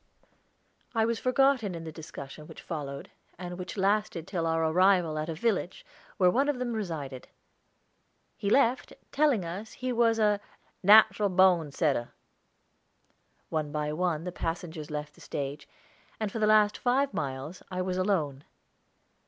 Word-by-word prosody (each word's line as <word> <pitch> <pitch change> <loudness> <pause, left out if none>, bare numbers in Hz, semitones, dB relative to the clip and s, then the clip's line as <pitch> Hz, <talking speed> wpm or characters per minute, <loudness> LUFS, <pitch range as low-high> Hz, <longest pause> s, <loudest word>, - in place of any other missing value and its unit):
I 220 -1 +3
was 230 0 -1
forgotten 255 -6 +2
in 165 - -6
the 160 - -6
discussion 150 -1 -9
which - - -12
followed, 140 -4 -6 0.3
and 180 0 -7
which 180 - -6
lasted 195 -3 0
till 170 -4 -2
our 165 0 +1
arrival 180 -1 +3
at 155 +2 -3
a 165 - -3
village, 190 -1 -1 0.3
where 180 -2 +5
one 275 +8 +2
of 290 - 0
them 250 -1 -2
resided. 155 - -5 1.1
He 200 - -2
left, 250 +1 +2 0.2
telling 280 - +2
us 190 +6 -6
he 255 0 -3
was 230 -1 +3
a 210 -2 +3 0.4
"natral 210 +1 +6
bone 180 -5 +4
setter." 140 -6 0 1.4
One 155 -2 -2
by 150 0 -2
one 165 -1 -1
the 180 - -4
passengers 165 -2 -5
left 150 0 -5
the - - -19
stage, 140 +1 -5 0.5
and 215 -2 -2
for 225 - -4
the 215 - +3
last 215 -1 +4
five 265 +3 +1
miles 140 +4 -4
I 185 0 -2
was 185 0 -2
alone. 160 -8 0
180 Hz, 155 wpm, -29 LUFS, 155-215 Hz, 1.4 s, natral